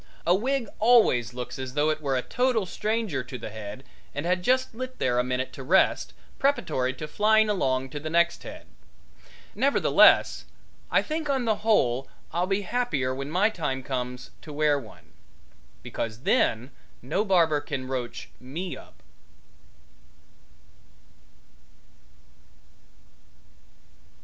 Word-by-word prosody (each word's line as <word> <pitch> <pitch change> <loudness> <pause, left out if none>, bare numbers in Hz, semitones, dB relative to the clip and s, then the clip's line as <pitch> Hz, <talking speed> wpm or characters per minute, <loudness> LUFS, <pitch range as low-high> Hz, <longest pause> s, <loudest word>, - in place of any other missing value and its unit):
A 175 - +5
wig 245 +5 0
always 215 - +4
looks 125 0 -6
as 130 0 -6
though 150 +1 +3
it 155 0 -4
were 140 -3 0
a 125 - -1
total 245 -4 +1
stranger 215 -4 -2
to 125 - -7
the 110 - -7
head 110 +3 -8 0.3
and 145 +3 -3
had 180 +1 +1
just 255 +5 +1
lit 255 +2 -6
there 125 -1 +1
a - - +3
minute 130 +1 -2
to - - -8
rest, 180 +9 +2 0.2
preparatory 200 - +1
to 155 +3 -6
flying 215 +5 +3
along 130 -8 0
to 145 - -5
the 155 +2 -5
next 170 +1 +2
head. - - -10 0.9
Nevertheless, 280 +1 +4 0.4
I - - +3
think 310 -1 -3
on 265 -3 +1
the 220 -2 +1
whole 135 - +2 0.3
I'll 175 +2 0
be 195 +1 0
happier 185 - -1
when 135 +2 -5
my 190 +7 +2
time 135 -9 -3
comes 125 -1 -4
to 155 - -10
wear 150 -1 +2
one, 110 -5 -15 0.7
because 115 0 -5
then 120 0 +1 0.3
no 155 +11 0
barber 165 -7 +3
can 140 -3 -5
roach 125 -2 -5
me 160 +9 -5
up. - - -16
155 Hz, 135 wpm, -26 LUFS, 130-215 Hz, 0.9 s, A